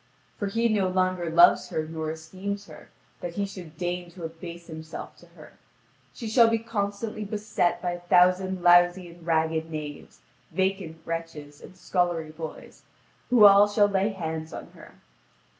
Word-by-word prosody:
For 205 - -3
he 230 +4 +1
no 205 -4 +1
longer 185 -2 0
loves 170 +2 +5
her 155 - -2
nor 160 -1 -4
esteems 190 +6 -6
her, 155 -4 -14 0.3
that 170 -1 -6
he 200 - 0
should 180 -5 -10
deign 175 0 -3
to 175 -2 -10
abase 170 +1 -8
himself 160 -1 -8
to - - -18
her. - - -15 0.5
She 230 - -7
shall 230 +1 +5
be 225 0 +2
constantly 215 -1 -3
beset 205 -4 -1
by 175 - 0
a 175 - -5
thousand 180 +1 +3
lousy 175 +1 +5
and 170 0 -15
ragged 160 -1 0
knaves, 150 -2 -8 0.3
vacant 190 -2 -1
wretches, 165 -3 -6
and 185 - -13
scullery 175 -4 -1
boys, 160 0 -9 0.5
who 240 -4 +7
all 200 0 +8
shall 205 0 +3
lay 200 0 +1
hands 160 -5 -5
on - - -8
her. - - -15
175 Hz, 160 wpm, -26 LUFS, 165-200 Hz, 0.5 s, all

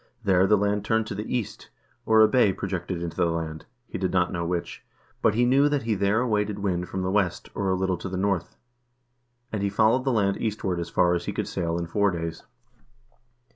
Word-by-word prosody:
There 95 -2 +4
the 105 - +5
land 105 0 0
turned 110 +1 +1
to - - -5
the 105 - -5
east,2 120 -5 -3 0.4
or 110 0 +6
a 110 - +8
bay 120 -6 +3
projected 90 -2 -4
into 85 -1 -5
the 90 -2 +2
land, 80 -1 -4 0.2
he - - -6
did 95 -2 -1
not 90 -1 +1
know 85 -1 -2
which, 85 0 -3 0.4
but 110 -2 +3
he 120 +2 +3
knew 135 +4 +4
that 145 -3 0
he 115 -1 0
there 100 +3 +1
awaited 105 -4 0
wind 90 -3 -2
from 95 -1 -3
the 90 - -1
west, 95 -3 0
or 100 -1 -1
a 95 - +2
little 95 -1 0
to 95 - -6
the 95 - -4
north, 95 -3 -1 1.0
and 105 - -2
he 100 - +1
followed 110 +5 +3
the 135 - +1
land 100 -4 +1
eastward 100 -5 -2
as 85 -1 -4
far 90 +1 +3
as 85 0 -2
he - - -2
could - - -3
sail 85 0 -2
in 85 - -2
four 100 +4 +1
days. 85 -2 -4
95 Hz, 225 wpm, -25 LUFS, 90-105 Hz, 1.0 s, a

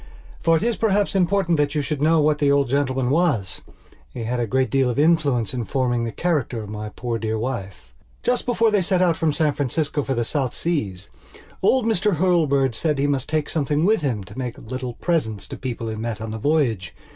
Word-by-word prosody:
For 165 0 +4
it - - -3
is 235 0 0
perhaps 205 -2 +1
important 185 -3 +2
that 145 0 +1
you 150 - +1
should 145 0 -3
know 160 +2 +4
what 150 0 +2
the 145 -1 +3
old 140 -3 +2
gentleman 130 -2 0
was; 140 - 0 0.5
he 120 - -6
had 120 +2 -2
a 120 - 0
great 130 +4 +1
deal 135 -2 +2
of 120 - -2
influence 145 -7 +2
in 125 -2 -2
forming 120 -1 0
the 115 - -3
character 140 -8 -1
of 105 - -9
my 105 0 -5
poor 115 +1 -4
dear 110 0 -2
wife. 100 - -5 0.3
Just 250 0 0
before 230 -2 +3
they 205 -2 +3
set 185 0 +2
out 170 -2 +3
from 160 -1 +1
San 150 0 +1
Francisco 145 +2 -1
for 135 -1 -2
the 120 - 0
South 130 0 -2
Seas 100 - -2 0.5
old 250 +5 +3
Mr 210 -3 +1
Hurlbird 150 -7 +2
said 150 +5 0
he 140 - +1
must 140 -2 -1
take 155 -1 0
something 150 0 0
with 215 -1 +3
him 120 -9 -1
to 90 - -13
make 125 -2 -4
little 125 +1 -5
presents 110 - -1
to - - -5
people 120 -3 -5
he 110 - -3
met 110 -1 -4
on 110 0 -5
the 110 - -5
voyage. 120 - 0
140 Hz, 220 wpm, -22 LUFS, 115-165 Hz, 0.5 s, For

